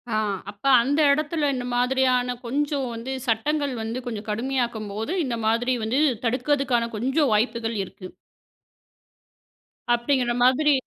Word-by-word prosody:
ஆ, -, -, +2 dB, 0.3 s
அப்ப 205 Hz, 0 st, -13 dB, 0.2 s
அந்த 280 Hz, +6 st, 0 dB
இடத்தில 305 Hz, 0 st, 0 dB
இந்த 250 Hz, -1 st, -4 dB
மாதிரியான 250 Hz, 0 st, +2 dB
கொஞ்சம் 280 Hz, +2 st, -1 dB
வந்து 230 Hz, +3 st, -5 dB
சட்டங்கள் 280 Hz, +5 st, 0 dB
வந்து 225 Hz, +3 st, -3 dB
கொஞ்சம் 225 Hz, -3 st, -5 dB
கடுமையாக்கும்போது, 225 Hz, -, -2 dB
இந்த 240 Hz, -3 st, -2 dB
மாதிரி 240 Hz, +3 st, +1 dB
வந்து 240 Hz, +6 st, 0 dB, 0.3 s
தடுக்கறதுக்கான 250 Hz, -1 st, +1 dB
கொஞ்சம் 265 Hz, +4 st, +1 dB
வாய்ப்புகள் 225 Hz, +1 st, 0 dB
இருக்கு. 185 Hz, 0 st, -10 dB, 1.9 s
அப்பிடிங்கிற 240 Hz, 0 st, +1 dB
மாதிரி, 285 Hz, +4 st, +4 dB
250 Hz, 115 wpm, -24 LUFS, 230-275 Hz, 1.9 s, மாதிரி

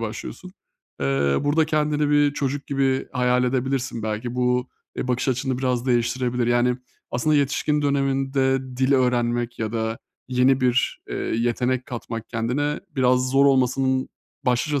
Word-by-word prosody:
başlıyorsun. 115 Hz, +11 st, -6 dB, 0.5 s
Eee, 70 Hz, 0 st, +1 dB
burada 155 Hz, +2 st, +2 dB
kendini 150 Hz, -1 st, +1 dB
bir 145 Hz, -1 st, +4 dB
çocuk 140 Hz, 0 st, -2 dB
gibi 135 Hz, -1 st, 0 dB
hayal 125 Hz, 0 st, +2 dB
edebilirsin 130 Hz, -2 st, -1 dB
belki. 110 Hz, +3 st, -3 dB
Bu, 125 Hz, 0 st, +1 dB, 0.3 s
eee, 125 Hz, -, -3 dB
bakış 125 Hz, +1 st, 0 dB
açını 130 Hz, 0 st, -1 dB
biraz 125 Hz, -1 st, -1 dB
değiştirebilir. 120 Hz, 0 st, +1 dB
Yani, 120 Hz, +1 st, +2 dB, 0.3 s
aslında 150 Hz, +5 st, +1 dB
yetişkin 145 Hz, +1 st, +1 dB
döneminde 135 Hz, -1 st, +1 dB, 0.2 s
dil 130 Hz, +2 st, +2 dB
öğrenmek 120 Hz, -2 st, +1 dB
ya 110 Hz, 0 st, -3 dB
da 110 Hz, 0 st, -2 dB, 0.3 s
yeni 130 Hz, +1 st, +3 dB
bir, 125 Hz, 0 st, +1 dB
eee, -, -, -4 dB
yetenek 125 Hz, +2 st, -1 dB
katmak 115 Hz, -3 st, -6 dB
kendine 125 Hz, +6 st, -1 dB, 0.2 s
biraz 125 Hz, 0 st, +2 dB
zor 140 Hz, +1 st, +5 dB
olmasının 130 Hz, 0 st, +2 dB, 0.4 s
başlıca 135 Hz, +4 st, +1 dB
130 Hz, 140 wpm, -23 LUFS, 120-135 Hz, 0.5 s, zor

